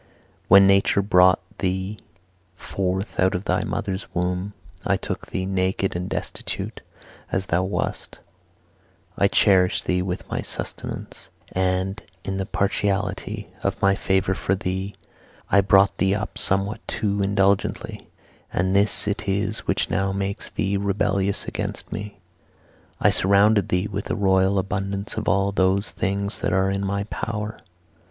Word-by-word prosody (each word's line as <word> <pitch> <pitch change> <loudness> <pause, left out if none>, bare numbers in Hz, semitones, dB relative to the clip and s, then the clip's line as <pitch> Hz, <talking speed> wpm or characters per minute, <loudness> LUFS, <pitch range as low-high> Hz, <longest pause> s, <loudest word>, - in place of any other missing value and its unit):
When 100 +1 +8
nature 100 +1 +4
brought 90 -2 +5 0.2
thee 95 +2 -2 0.6
forth 95 +1 -3
out 95 0 +3
of 90 +4 -3
thy - - +1
mother's 100 -4 -3
womb, 90 +3 -1 0.3
I - - +2
took - - -5
thee, 95 - -3
naked 95 0 0
and 90 +1 -3
destitute - - -4 0.5
as 95 0 0
thou 90 0 +1
wast, 95 +2 -3 1.0
I 100 - +4
cherished 95 -2 +3
thee 90 0 +1
with 90 0 -4
my - - -2
substance, - - -6 0.2
and, 95 +1 0 0.2
in 95 0 -3
the 95 0 -3
partiality 100 -1 -1
of - - -1
my 100 0 +4
favour 95 0 +1
for 95 0 0
thee, 95 +1 -3 0.6
I 100 - +6
brought 95 0 +4
thee 95 +2 +3
up 105 +1 -4
somewhat 95 +2 +1
too 100 -1 -1
indulgently, 100 0 0 0.4
and 95 +2 0
this 100 +1 +3
it 105 +1 -2
is 100 +2 0
which - - 0
now 95 +1 +1
makes 100 0 -3
thee 100 -1 -1
rebellious 100 0 0
against - - -5
me. 105 0 -6 0.8
I - - +4
surrounded 100 +1 +4
thee 90 +2 +1
with 100 -1 -4
a - - 0
royal 95 -1 +3
abundance 100 +1 -2
of 110 - -1
all 100 0 +2
those 95 +1 +1
things 100 +1 -2
that - - -1
are 95 +1 +2
in 100 0 -2
my 100 +1 -1
power. 105 0 -4
95 Hz, 145 wpm, -23 LUFS, 95-100 Hz, 1.0 s, When